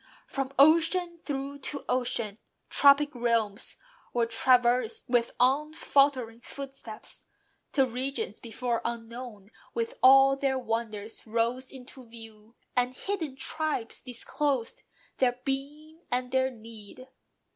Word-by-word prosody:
"From 270 -1 -3
ocean 335 +4 +4
through 280 -1 -4
to 280 +1 -5
ocean" 240 -4 -1 0.3
tropic 285 +1 +5
realms 230 -3 -1 0.4
Were 240 -1 +2
traversed 240 0 +2
with 240 -1 +2
unfaltering 275 -3 +2
footsteps, 270 -5 -9 0.4
till 270 -2 +3
Regions 270 - -3
before 235 +1 -2
unknown, 230 -3 -6 0.2
with 465 +2 -3
all 270 +1 +8
their 275 -1 0
wonders 225 -3 -4
Rose 235 +3 -1
into 260 0 -11
view, 225 -1 -12 0.2
and 250 +1 +1
hidden 335 -8 -3
tribes 295 -3 -2
disclosed 255 +1 -2 0.4
Their 250 -1 +2
being 295 +4 -4
and 250 0 -1
their 260 0 +2
need. 225 0 -12
255 Hz, 110 wpm, -28 LUFS, 230-280 Hz, 0.4 s, all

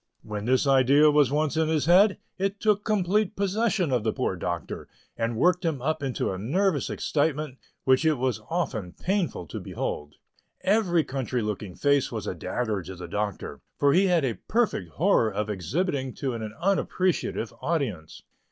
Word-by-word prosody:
When 105 -1 -5
this 130 +3 +2
idea 140 +2 +5
was 145 -3 +4
once 150 +1 0
in 160 0 +2
his 155 -2 +1
head, 190 +4 +5 0.2
it 195 +1 -1
took 210 -1 +2
complete 210 0 +1
possession 200 -4 0
of 125 -4 +1
the 110 - +1
poor 125 -7 -1
Doctor, 85 -1 -4 0.3
and 115 0 -2
worked 180 - +3
him 160 -5 0
up 155 +4 -1
into 135 -7 -1
a 95 - -4
nervous 160 - 0
excitement 150 -2 -1 0.2
which 130 +2 +4
it 160 -1 +3
was 130 -1 -1
often 120 - -2
painful 185 - -1
to 75 - -6
behold. 75 0 -5 0.5
Every 185 -5 +2
country 130 -4 -2
looking 105 -3 -4
face 140 -1 +2
was - - -4
a - - -2
dagger 110 -5 -2
to 95 +2 -8
the 90 0 -8
Doctor, 100 +2 -4 0.2
for 140 -1 +4
he 195 +4 +4
had 170 -5 +3
a 120 - 0
perfect 220 - 0
horror 160 - +3
of 105 +2 -2
exhibiting 130 - -2
to 135 -3 -2
an 115 - -5 0.2
unappreciative 185 - 0
audience. 115 - -3
140 Hz, 170 wpm, -26 LUFS, 115-180 Hz, 0.5 s, idea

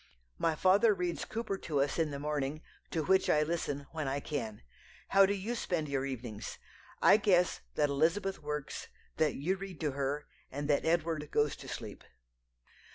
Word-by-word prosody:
My 165 -1 +2
father 200 +6 +5
reads 180 -2 -2
Cowper 215 -4 -3
to 150 -4 -1
us 140 +4 +1
in 160 -2 +2
the 140 - -4
morning, 150 +1 -2 0.3
to 160 - -1
which 190 +3 +3
I 150 - +4
listen 150 -3 -2
when 155 -3 -3
I 135 +1 0
can. 125 -8 -4 0.5
How 195 0 +7
do 200 - +1
you 205 +5 -3
spend 175 -9 -1
your 135 -1 -1
evenings? 120 -5 -6 0.5
I - - +8
guess 180 -4 +3
that 150 -1 +3
Elizabeth 170 +7 +1
works, 150 -1 -4 0.3
that 155 -3 +2
you 180 +8 0
read 190 -4 -8
to 150 -2 +1
her, 140 +2 -2 0.2
and 145 +2 -4
that 145 -1 +2
Edward 160 -2 +1
goes 145 -1 +2
to - - -10
sleep." - - -7
155 Hz, 175 wpm, -32 LUFS, 145-185 Hz, 0.5 s, I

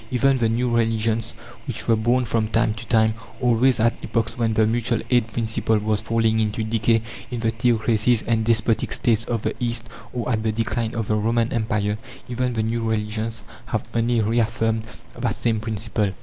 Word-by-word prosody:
Even 130 +1 +2
the 115 -2 +2
new 120 +1 +1
religions 115 -1 +1 0.3
which - - -3
were 115 - +5
born 120 +3 +2
from 110 -1 0
time 115 0 +1
to 115 +2 -9
time 110 -1 +3 0.3
always 125 0 +3
at 115 +1 +3
epochs 115 -1 -1
when 115 -2 0
the 110 - +4
mutual 115 +1 +1
aid 120 -3 +4
principle 110 -1 0
was 105 0 0
falling 110 0 +1
into 110 0 0
decay 115 0 +1 0.3
in 120 -2 -4
the 115 -1 +1
theocracies 115 0 +2
and 115 -1 +1
despotic 115 0 +1
States 115 -1 +1
of 115 -3 -2
the 110 - 0
East, 115 -1 -1 0.2
or 120 -2 -3
at 110 -2 +1
the 110 0 0
decline 115 +1 -2
of 115 -2 -2
the 105 - +1
Roman 115 +2 +1
Empire 110 -2 0 0.3
even 125 0 -1
the 110 -2 0
new 115 +1 -1
religions 110 0 -2 0.2
have - - -1
only 115 0 +2
reaffirmed 115 0 0 0.3
that - - 0
same 115 -2 0
principle. 110 -2 -2
115 Hz, 185 wpm, -23 LUFS, 110-115 Hz, 0.3 s, were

